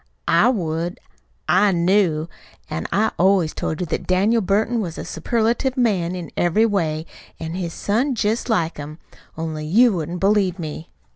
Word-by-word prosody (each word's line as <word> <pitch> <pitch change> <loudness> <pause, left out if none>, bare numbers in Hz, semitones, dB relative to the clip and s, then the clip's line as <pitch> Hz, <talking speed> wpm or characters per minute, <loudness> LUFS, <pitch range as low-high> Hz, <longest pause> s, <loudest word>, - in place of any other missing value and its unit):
"I 170 +9 +5
would. 170 -6 -2 0.5
I 200 +3 +4
KNEW. 170 -3 +2 0.4
An' 80 - -3
I 220 +2 +2
always 185 -3 +3
told 160 - -3
you - - 0
that 155 - -4
Daniel 205 +6 +3
Burton 215 +4 +1
was 170 -5 -5
a - - -5
superlative 235 - 0
man 190 -8 +1
in 175 -4 -7
every 175 +6 +3
way, 165 -7 -1 0.3
an' 160 0 -5
his 175 -2 -3
son's 240 +4 0
jest 220 +4 0
like 170 -7 0
him. 150 +1 -7 0.4
Only 155 -1 -4
you 225 +7 +5
wouldn't 170 0 -3
believe 195 -2 +2
me." 160 -1 -6
185 Hz, 160 wpm, -21 LUFS, 165-215 Hz, 0.5 s, I